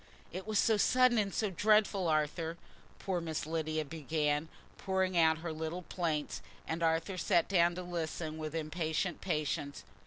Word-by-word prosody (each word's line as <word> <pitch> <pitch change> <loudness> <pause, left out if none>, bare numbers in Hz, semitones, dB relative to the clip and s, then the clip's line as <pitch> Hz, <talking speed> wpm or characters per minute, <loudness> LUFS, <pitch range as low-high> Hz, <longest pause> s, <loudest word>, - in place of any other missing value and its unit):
"It 185 +4 -6
was 215 -1 0
so 220 +1 +4
sudden 250 +2 +4
and 200 -2 0
so 210 -1 -1
dreadful, 205 -1 +3
Arthur," 160 +2 0 0.4
poor 185 -3 -2
Miss 160 -3 -3
Lydia 155 -1 -1
began, 150 0 -1 0.3
pouring 190 -1 0
out 160 -2 +5
her 165 - -2
little 160 +3 -4
plaints, 160 -4 -2 0.3
and 160 +1 -2
Arthur 165 +3 +1
sat 170 0 +3
down 175 -2 +3
to 180 - -5
listen 160 -2 -4
with 155 0 -4
impatient 160 +2 -2
patience. 150 -4 -2
165 Hz, 155 wpm, -33 LUFS, 155-185 Hz, 0.4 s, out